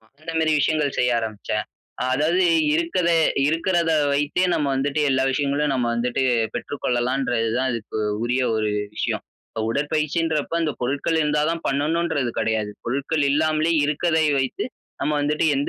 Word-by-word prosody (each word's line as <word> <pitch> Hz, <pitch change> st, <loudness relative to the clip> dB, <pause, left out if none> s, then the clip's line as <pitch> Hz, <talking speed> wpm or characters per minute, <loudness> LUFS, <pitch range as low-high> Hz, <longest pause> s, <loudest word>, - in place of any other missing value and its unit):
அ -, -, -30 dB, 0.2 s
அந்த 165 Hz, +1 st, -6 dB
மேரி 160 Hz, -1 st, +2 dB
விஷயங்கள் 150 Hz, -1 st, +1 dB
செய்ய 125 Hz, -, +3 dB
ஆரம்பிச்சேன். 110 Hz, -3 st, -3 dB, 0.4 s
அ -, -, +1 dB
அதாவது 165 Hz, +7 st, +2 dB, 0.3 s
இருக்கற 170 Hz, +2 st, +1 dB, 0.4 s
இருக்கறத 165 Hz, +1 st, +1 dB, 0.2 s
வைத்தே 150 Hz, +5 st, +1 dB
நம்ம 150 Hz, -, 0 dB
வந்துட்டு 140 Hz, +3 st, 0 dB
எல்லா 130 Hz, 0 st, +2 dB
விஷயங்களும் 145 Hz, +2 st, 0 dB
நம்ம 125 Hz, -2 st, 0 dB
வந்துட்டு, 120 Hz, +2 st, -1 dB, 0.3 s
பெற்றுக்கொள்ளலான்றது 125 Hz, -3 st, -1 dB
தான் 130 Hz, 0 st, +1 dB
அதுக்கு 110 Hz, -1 st, -5 dB, 0.3 s
உரிய 125 Hz, +2 st, +1 dB
ஒரு 110 Hz, -1 st, 0 dB, 0.3 s
விஷயம். -, -, -2 dB, 0.5 s
"உடற்பயிற்சின்றப்ப 155 Hz, +3 st, 0 dB
அந்த 155 Hz, -, 0 dB
பொருட்கள் 140 Hz, +6 st, 0 dB
இருந்தா 150 Hz, -1 st, +1 dB
தான் 165 Hz, 0 st, -3 dB
பண்ணனுன்றது 150 Hz, -1 st, 0 dB
கிடையாது. 110 Hz, -1 st, 0 dB
பொருட்கள் 140 Hz, +5 st, -1 dB
இல்லாமலே 155 Hz, +2 st, +2 dB
இருக்கதை 160 Hz, +2 st, +1 dB
வைத்து, 130 Hz, -1 st, -1 dB, 0.4 s
நம்ம 150 Hz, -, 0 dB
வந்துட்டு 150 Hz, +2 st, 0 dB
எந்த 140 Hz, -, -1 dB
145 Hz, 140 wpm, -23 LUFS, 130-160 Hz, 0.5 s, செய்ய